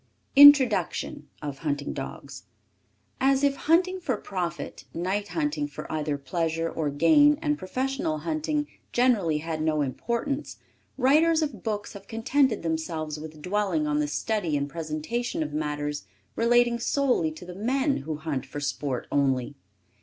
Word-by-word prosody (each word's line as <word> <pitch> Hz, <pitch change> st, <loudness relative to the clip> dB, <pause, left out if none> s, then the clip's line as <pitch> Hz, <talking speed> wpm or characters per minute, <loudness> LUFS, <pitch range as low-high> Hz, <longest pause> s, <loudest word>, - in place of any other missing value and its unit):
] -, -, -41 dB
INTRODUCTION. 260 Hz, -, +6 dB, 0.2 s
As 140 Hz, -1 st, -5 dB, 1.0 s
if 280 Hz, -1 st, +3 dB
hunting 365 Hz, +6 st, +2 dB
for 265 Hz, -10 st, -1 dB
profit, 175 Hz, -5 st, -5 dB
night 190 Hz, +4 st, -1 dB
hunting 295 Hz, +3 st, -1 dB
for -, -, -8 dB
either 150 Hz, -2 st, -1 dB
pleasure 165 Hz, +3 st, -2 dB
or 160 Hz, -2 st, -2 dB
gain 290 Hz, -, +5 dB
and 300 Hz, -2 st, 0 dB
professional 270 Hz, -, -2 dB
hunting 310 Hz, -2 st, -1 dB, 0.3 s
generally 220 Hz, -11 st, +2 dB
had 160 Hz, 0 st, -4 dB
no 155 Hz, -1 st, +1 dB
importance, 235 Hz, -, -3 dB, 0.4 s
writers 315 Hz, +5 st, +4 dB
of 260 Hz, -10 st, -4 dB
books 210 Hz, -1 st, -3 dB
have 200 Hz, -1 st, -11 dB
contented 235 Hz, 0 st, +1 dB
themselves 160 Hz, -2 st, -3 dB
with 155 Hz, -1 st, -10 dB
dwelling 190 Hz, -5 st, 0 dB
on 150 Hz, 0 st, 0 dB
the 150 Hz, -, +1 dB
study 175 Hz, 0 st, -1 dB
and 140 Hz, 0 st, -2 dB
presentation 165 Hz, +6 st, -3 dB
of 150 Hz, -1 st, -6 dB
matters 150 Hz, -3 st, -3 dB, 0.3 s
relating 240 Hz, 0 st, +3 dB
solely 250 Hz, -, +1 dB
to 160 Hz, -, -11 dB
the 180 Hz, -, -8 dB
men 265 Hz, +8 st, 0 dB
who 155 Hz, +2 st, -4 dB
hunt 150 Hz, -4 st, -3 dB
for 135 Hz, +2 st, -7 dB
sport 140 Hz, -2 st, -3 dB
only. 135 Hz, -2 st, +1 dB
180 Hz, 140 wpm, -26 LUFS, -, 1.0 s, INTRODUCTION